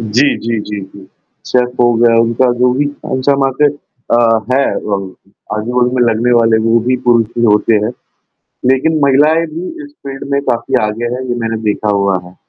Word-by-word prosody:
जी, 115 +6 +1
जी, 115 0 -2
जी, 105 0 -6
जी। 95 0 -12 0.4
Safe 125 -1 +1
हो 120 0 +4
गया, 115 0 +3
उनका 115 +2 +1
जो 125 0 +3
भी 140 +3 0
कौन-सा 140 -1 -1
मार्केट 145 +2 +1 0.3
अ, - - +5 0.4
हैं 135 +1 +1
वो, 105 -1 -1 0.6
आजू-बाजू 125 +3 0
में 125 - +2
लगने 120 +3 0
वाले 115 -1 +3
वो 115 +1 +4
भी 130 - +2
पुरुष 115 -2 +4
ही 120 - +2
होते 105 +1 +3
हैं। 110 - -1 0.8
लेकिन 155 +4 0
महिलाएँ 150 +4 +3
भी 175 +3 -5 0.2
इस 290 - -17
फ़ील्ड 135 0 -6
में 140 - +1
काफ़ी 115 - -1
आगे 110 +3 -3
हैं, 130 - -5
ये 120 - -1
मैंने 115 0 -2
देखा 105 0 -2
हुआ 100 -1 +1
है। 90 +1 -15
120 Hz, 185 wpm, -14 LUFS, 110-135 Hz, 0.8 s, अ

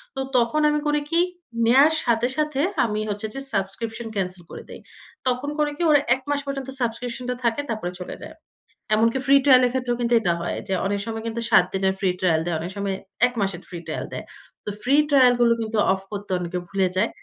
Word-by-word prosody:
তো - - -4 0.2
তখন 240 +6 +2
আমি 300 0 +1
করি 295 0 +2
কী 335 - +2 0.5
নেয়ার 275 +7 +6
সাথে, 235 0 +2
সাথে 300 -2 -1 0.3
আমি 210 -2 -2
হচ্ছে 210 +1 -3
যে 270 - -3
সাবস্ক্রিপশন 220 +4 -3
ক্যানসেল 185 -2 -3
করে - - -8
দেই। - - -9 0.5
তখন 255 +3 0
করে 300 -1 +2
কী - - -6
ওরা 295 - +6 0.2
১ 265 - -11
মাস 290 0 +1
পর্যন্ত 275 -1 -4
সাবস্ক্রিপশনটা 245 +1 -3
থাকে 235 +4 +1
তারপরে 215 -6 -3
চলে 180 - -6
যায়। 315 - -10 0.6
এমনকি 230 +3 +2
ফ্রি 275 0 +6
ট্রায়ালের 255 -3 +6
ক্ষেত্রেও 250 -2 -1
কিন্তু 240 0 +1
এটা 180 -6 +1
হয়, 175 - -3
যে 195 - -1
অনেক 200 +1 0
সময় 225 -1 -5
কিন্তু 230 +1 -3
৭ 180 - +6
দিনের 190 0 +1
ফ্রি 190 - +1
ট্রায়াল 165 -4 +2
দেয়, 175 -1 -1
অনেক 170 +3 -5
সময় 200 -1 -1 0.3
১ 250 - -8
মাসের 195 -3 -2
ফ্রি 175 - -6
ট্রায়াল - - -4
দেয়। - - -6 0.4
তো - - -3
ফ্রি 270 +3 +3
ট্রায়াল 260 -4 +6
গুলো 235 -1 +5
কিন্তু 220 0 -3 0.2
অফ 190 - -4
করতে 205 -1 -6
অনেকে 180 0 -3
ভুলে 195 -1 +1
যায় 220 +4 +2
230 Hz, 210 wpm, -23 LUFS, 195-260 Hz, 0.6 s, নেয়ার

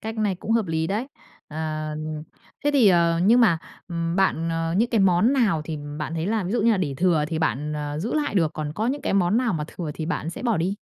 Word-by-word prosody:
Cách 220 0 -5
này 210 -3 +1
cũng 185 - -7
hợp 225 -4 +2
lý 160 0 -1
đấy! 210 +8 -2 0.4
Ờ, 155 0 -4 0.7
thế 290 - +3
thì, 255 -7 +5
ờ, 170 -2 +3
nhưng 235 +5 +6
mà, 175 -8 +4 0.3
ừm, 170 0 -2
bạn, 170 -4 +1
ờ 165 0 -1
những 235 +3 +2
cái 225 -4 +2
món 195 +6 +4
nào 210 - +2
thì 155 -1 -5 0.2
bạn 155 +1 -4
thấy 165 +2 -2
là, 215 -2 0
ví 185 - -3
dụ 240 - +1
như 235 - +4
là, 215 - +3
để 150 -7 -2
thừa 165 -2 +2
thì 160 -1 -2
bạn, 150 -1 -1
ờ, 150 0 -4
giữ 215 +9 -3
lại 295 -6 -1
được, 165 -5 +2
còn 150 -1 -4
có 215 +6 -2
những 280 +3 -2
cái - - -1
món 195 +2 +2
nào 245 -2 +1
mà 155 -4 -2
thừa 160 -1 -6
thì 160 - -4
bạn 165 -2 -2
sẽ 170 - -8
bỏ 235 -4 +1
đi? 180 +5 0
175 Hz, 265 wpm, -24 LUFS, 160-220 Hz, 0.7 s, nhưng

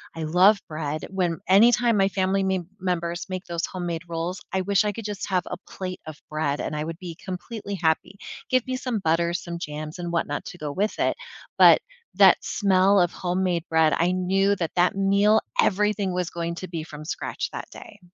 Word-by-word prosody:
I 165 - -4
love 185 +6 +5
bread, 155 -1 -4
when 180 -3 -1
anytime 230 +3 +5
my 195 -1 +4
family 195 0 0
me 190 -1 0 0.2
members 175 -1 -2
make 185 0 -4
those 170 -1 -2
homemade 175 -3 -4
rolls, 170 +4 -4
I 190 - +1
wish 200 +2 +2
I 210 - +1
could 230 - -7
just 205 -2 -4
have 185 -2 +1
a - - -5
plate 185 -1 -6
of 155 -1 -7
bread, 155 -2 -1
and 155 - -3
I 150 - -2
would 165 0 -5
be 175 -3 -7
completely 200 +3 -6
happy, 170 +3 0 0.3
give 255 -2 +2
me 255 - -2
some 250 -4 -2
butter, 170 0 +1
some 170 -1 -4
jams, 155 +1 -6
and 175 -1 -4
whatnot 145 -3 -1
to - - -8
go 150 -3 -4
with 205 +8 -1
it, - - +1 0.4
but - - +8 0.3
that - - +7
smell 195 -1 +3
of 175 -1 +2
homemade 180 -1 -1
bread, 160 -1 +4
I 175 +2 +2
knew 195 +2 +2
that 170 -4 -3
that 180 +1 +3
meal, 200 +2 +3 0.2
everything 205 -1 +1
was 180 -1 -1
going 170 0 -4
to 185 - -6
be 165 -2 -4
from 155 -1 -10
scratch - - -4
that - - -7
day. 205 - -12
180 Hz, 200 wpm, -25 LUFS, 165-195 Hz, 0.4 s, but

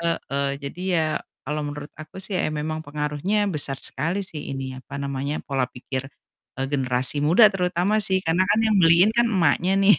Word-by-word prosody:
Heeh. 140 -4 -1
Jadi 140 +5 -7 0.2
ya 155 -1 0 0.2
kalau 150 +3 -2
menurut 145 0 -6
aku 155 +2 -11
sih 190 -1 -2
ya - - +1
memang 155 +1 -3
pengaruhnya 150 +8 -1
besar 145 -4 0
sekali 165 +8 -1
sih 165 -5 -7
ini 130 -1 -5
apa 130 - -12
namanya, 140 +1 -3
pola 135 -2 -1
pikir, 130 +1 -6 0.5
eee, 135 - -1
generasi 130 -1 +1
muda 175 +9 +6
terutama 180 +2 +1
sih 190 -3 +1
karena 175 +3 +2
kan 205 +2 +3
yang 220 -2 +3
beliin 170 +3 +6
kan 235 +1 +3
emaknya 180 -3 +2
nih. 205 +1 +7
155 Hz, 180 wpm, -24 LUFS, 140-185 Hz, 0.5 s, nih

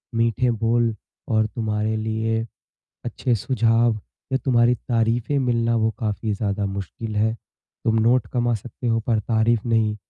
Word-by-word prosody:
मीठे 115 +2 +2
बोल 115 0 +1 0.3
और 110 -1 +3
तुम्हारे 110 -1 -1
लिए 110 +1 -1 0.6
अच्छे 120 +1 -1
सुझाव 115 0 +2 0.3
या - - +3
तुम्हारी 120 -2 +4
तारीफ़ें 120 +3 0
मिलना 115 -3 +1
वो 110 0 +2
काफ़ी 110 -1 -2
ज़्यादा 100 -1 -1
मुश्किल 100 +3 -5
है। 110 +2 +2 0.5
तुम 110 0 +2
नोट 120 +2 +3
कमा 120 -1 +1
सकते 120 +3 -7
हो 115 -1 +2
पर 115 0 0
तारीफ़ 110 +1 +2
नहीं। 110 -2 +2
115 Hz, 145 wpm, -23 LUFS, 110-120 Hz, 0.6 s, तुम्हारी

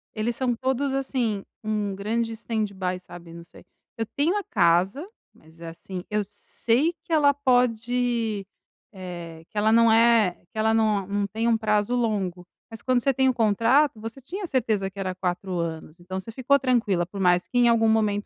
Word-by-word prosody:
Eles 230 +2 -1
são 250 -2 0
todos, 265 +2 -1
assim, 245 -7 -1 0.2
um 210 -2 -2
grande 225 +3 -2
stand-by, 200 -5 -3
sabe, 175 -2 -12
não 170 0 -10
sei. - - -17 0.3
Eu 225 - -1
tenho 335 +8 +2
a 405 - -2
casa, 190 - +2 0.3
mas, 160 +1 -21
é 165 - -7
assim, 180 +2 -8
eu 210 0 0
sei 240 +9 0
que 335 - -14
ela 285 -2 +5
pode 245 -4 0 0.5
eh, 175 -3 -8
que 210 - -11
ela 215 +1 +3
não 230 0 +5
eh, 225 -5 +4
que 220 - -13
ela 220 0 +2
não 215 -4 +1
não 200 0 -1
tem 225 +4 -2
um 230 -1 +3
prazo 210 +2 +1
longo, 195 -7 -1 0.3
mas 225 - -9
quando 255 -2 +2
você 275 +1 +2
tem 265 +1 +2
o - - +1
contrato, 230 +4 +2
você 225 +5 -8
tinha 375 +9 -6
certeza 220 -8 0
que 200 - -11
era 185 -1 -3
4 180 0 -3
anos, 165 0 -5
então 185 +2 -5
você 225 +4 -9
ficou 270 +4 +2
tranquila 225 -9 +1
por 195 +2 -9
mais 180 -1 +3
que 245 - -3
em 240 - +5
algum 225 -1 +3
momento, 210 -2 +1
220 Hz, 190 wpm, -25 LUFS, 190-245 Hz, 0.5 s, ela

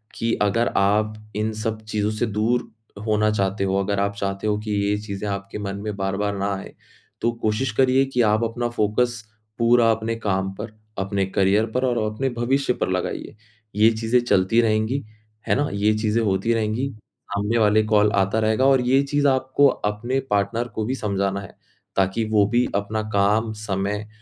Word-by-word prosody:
कि 115 0 -1
अगर 115 +3 +2
आप 105 +2 +2 0.2
इन 110 +1 0
सब 110 0 -3
चीज़ों 105 0 0
से 110 +3 -1
दूर 110 +3 0 0.4
होना 105 0 +2
चाहते 100 -1 0
हो, 95 0 0
अगर 100 0 -1
आप 100 0 0
चाहते 100 +1 -2
हो 105 -1 +1
कि 105 0 -5
ये 100 0 +1
चीज़ें 105 -1 -5
आपके 100 +1 -5
मन 100 -1 -4
में 105 -1 -3
बार-बार 100 +1 -1
ना 100 +1 -1
आए, 95 - -9 0.5
तो 120 +1 +2
कोशिश 110 +3 0
करिए 130 +1 +4
कि 125 -2 0
आप 110 +1 +3
अपना 120 +1 -2
फ़ोकस 120 +2 +1 0.5
पूरा 115 -1 +5
अपने 110 +1 -1
काम 95 -3 -1
पर, 105 +1 -7 0.3
अपने 95 0 0
करियर 95 +3 +2
पर 130 +1 +2
और 120 -2 0 0.2
अपने 135 +5 -1
भविष्य 130 +2 +1
पर - - -2
लगाइए। 90 +2 -3 0.4
ये 110 +2 +5
चीज़ें 115 +2 +1
चलती 115 0 +3
रहेंगी, 110 +5 0 0.4
है - - +3
ना? 145 +1 0
ये 105 +2 +2
चीज़ें 110 +1 +1
होती 100 +3 +1
रहेंगी, 115 +4 -1 0.4
सामने 105 +3 0
वाले 110 0 +4
का - - -6
कॉल 105 -1 +4
आता 95 +3 +2
रहेगा 110 +4 +2
और 135 -2 +5
ये 130 +2 +3
चीज़ 145 +1 +1
आपको 130 +1 +3
अपने 120 +3 -1
पार्टनर 105 +4 0
को 110 - 0
भी 130 +3 -1
समझाना 100 -3 -1
है, 100 - -12 0.4
ताकि 95 +4 +1
वो 105 -2 +4
भी 120 +1 +2
अपना 100 +2 -1
काम, 105 +3 +2
समय 105 0 -3
110 Hz, 185 wpm, -23 LUFS, 100-115 Hz, 0.5 s, पूरा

